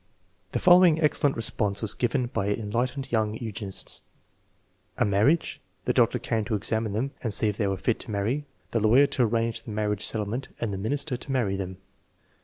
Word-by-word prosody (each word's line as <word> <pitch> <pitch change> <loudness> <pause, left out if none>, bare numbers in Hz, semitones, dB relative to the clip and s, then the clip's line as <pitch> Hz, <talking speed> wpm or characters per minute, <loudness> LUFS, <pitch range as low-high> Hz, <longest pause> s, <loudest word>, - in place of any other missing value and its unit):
The - - +1
following 175 -3 +6
excellent 150 -2 +2
response 105 -2 -1
was 105 - +2
given 125 +1 0
by 100 -5 -2
an 105 - 0
enlightened 125 +5 -2
young 110 -2 +1
eugenist: 105 -4 -4 1.0
"A - - +2
marriage; 105 +12 +1 0.2
the - - +1
doctor - - +3
came 110 -1 -1
to 110 - -1
examine 110 +1 -1
them 125 +6 -1
and 115 -6 -2
see 105 +1 +4
if 105 - -4
they 105 - 0
were 95 -1 -1
fit 110 +5 0
to - - -6
marry, 110 +8 -1 0.2
the 115 - +1
lawyer 115 +6 +5
to 140 - -1
arrange 115 0 +1
the 115 - -11
mar 105 0 -1
riage 105 -1 -2
settlement, 110 +4 0
and 110 -4 -2
the - - -3
minister 135 +5 -2
to 135 - -8
marry 115 -7 0
them." 95 -1 -5
115 Hz, 200 wpm, -26 LUFS, 105-130 Hz, 1.0 s, following